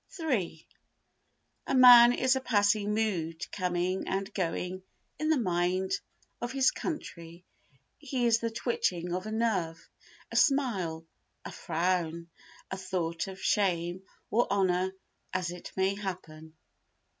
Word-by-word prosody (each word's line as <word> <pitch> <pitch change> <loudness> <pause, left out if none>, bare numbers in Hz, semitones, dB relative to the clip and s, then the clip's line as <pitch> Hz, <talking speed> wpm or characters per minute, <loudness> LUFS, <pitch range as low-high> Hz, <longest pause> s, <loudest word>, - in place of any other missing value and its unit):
iii 215 - -2 1.0
A - - 0
man 245 -2 +9
is 260 +1 +2
a 265 - -1
passing 210 -3 +2
mood 170 -7 -1
coming 180 0 -1
and 195 +2 -3
going 180 0 -3 0.4
in 310 +1 0
the 315 - +4
mind 185 -3 0 0.5
of 240 +1 -3
his 265 -1 +3
country; 170 - -7 0.5
he 265 -4 -2
is 230 -1 +4
the 230 - -2
twitching 185 -7 -2
of 185 +3 -3
a - - -5
nerve, 190 -8 -1 0.4
a - - -7
smile, 195 - +1 0.4
a - - -6
frown, 170 -1 -2 0.4
a 190 - -3
thought 180 -3 -3
of 190 -1 -8
shame 180 -3 0 0.3
or 235 +3 +2
honour, 190 -1 +1 0.4
as 180 -2 -1
it 175 0 -9
may 190 +1 +2
happen. 165 -6 -7
190 Hz, 130 wpm, -29 LUFS, 175-230 Hz, 1.0 s, man